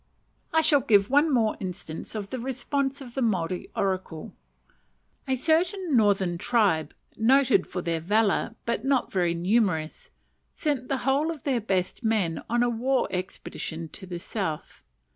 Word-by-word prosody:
I 320 - +4
shall 295 -2 +5
give 205 -3 +3
one 290 +3 +4
more 225 -5 +2
instance 180 -1 -6
of 205 -2 -5
the 260 - -3
response 270 +2 -2
of 245 -3 -10
the 270 - -2
Maori 185 -6 -1
oracle. 185 -5 -2 0.9
A 265 - +1
certain 335 +4 +1
northern 195 -6 +2
tribe, 190 -9 +1 0.2
noted 260 +3 +4
for 180 - -4
their 165 -1 -1
valour, 210 +5 +1
but 235 +1 -1
not 270 -1 +1
very 175 -3 +1
numerous, 180 -3 0 0.5
sent 285 -5 -1
the 275 - 0
whole 280 +4 +2
of 320 -4 -5
their 260 -5 0
best 190 +2 -1
men 205 -8 0
on 240 +1 +2
a - - +2
war 250 +3 +1
expedition 170 -3 -5
to 190 +5 -8
the 175 -1 -5
south. 170 -5 -4
220 Hz, 155 wpm, -26 LUFS, 185-265 Hz, 0.9 s, shall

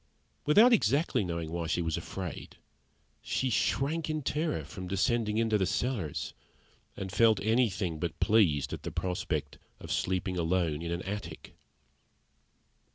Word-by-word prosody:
Without 220 +11 +7
exactly 140 - +2
knowing 85 -3 -3
why 85 -1 -2
she 85 +2 0
was 80 -1 -1
afraid, 90 +1 -6 0.6
she 130 -1 -1
shrank 150 +7 0
in 155 -1 -2
terror 150 - -1
from 90 +4 -7
descending 105 +3 +1
into 110 -2 +2
the 95 - +1
cellars, 115 - -2 0.6
and 95 -1 -5
felt 110 0 +4
anything 100 -7 +1
but 85 0 -3
pleased 95 -11 +3
at - - -5
the - - -4
prospect 80 -6 -3 0.2
of - - -8
sleeping 90 0 -1
alone 85 -2 0
in 85 0 -4
an 85 +1 -2
attic. 105 +2 -6
95 Hz, 140 wpm, -30 LUFS, 85-115 Hz, 0.6 s, Without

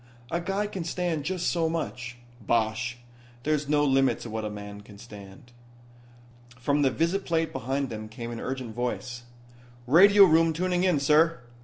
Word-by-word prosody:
"A 170 - -1
guy 195 +4 -1
can 195 -4 -5
stand 165 -3 -2
just 180 +1 -2
so 165 -2 +1
much." 125 -7 -4 0.2
"Bosh. 115 +3 0 0.5
There's 150 0 -1
no 145 -1 +3
limit 135 -3 +2
to 115 - -7
what 110 0 -3
a 105 - -3
man 105 0 -8
can 105 0 -15
stand." 105 +3 -13 1.1
From 140 +4 +1
the 135 - +4
visiplate 165 +2 -1
behind 135 +2 -2
them 110 -1 -6
came 115 +1 -7
an 115 - -6
urgent 130 -3 -5
voice: 125 +1 -4 0.6
"Radio 200 +9 +7
room 165 -2 +4
tuning 180 +2 0
in, 180 -6 +3
sir." 150 +1 +3
140 Hz, 160 wpm, -27 LUFS, 120-165 Hz, 1.1 s, Radio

